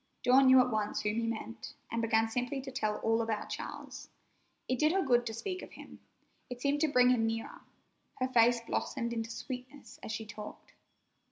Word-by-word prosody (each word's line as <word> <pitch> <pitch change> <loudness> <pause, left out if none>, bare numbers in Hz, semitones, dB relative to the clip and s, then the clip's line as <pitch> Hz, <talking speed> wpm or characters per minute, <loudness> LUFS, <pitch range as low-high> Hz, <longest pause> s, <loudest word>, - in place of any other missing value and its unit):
Dawn 260 +2 +6
knew 260 0 +8
at 250 0 +3
once 215 -1 -1
whom 210 0 0
he 230 - -1
meant, 230 0 -6 0.2
and 230 +1 -1
began 225 0 +2
simply 245 +4 -2
to 265 - -8
tell 215 -4 -1
all 225 +1 +2
about 225 -2 -2
Charles. - - -7 0.6
It 255 -1 -1
did 305 +1 +4
her 385 - +2
good 245 -3 +3
to 225 - -4
speak 370 - -4
of - - -11
him. - - -12 0.5
It 250 -1 -6
seemed 285 +2 0
to 315 - +4
bring 250 -2 +5
him 225 -3 +2
nearer. 225 0 -4 0.5
Her 255 - -1
face 240 -1 +4
blossomed 235 0 -2
into 225 -1 -3
sweetness 255 +4 -8
as - - -6
she 220 0 -4
talked. 210 0 -10
240 Hz, 195 wpm, -32 LUFS, 225-255 Hz, 0.6 s, knew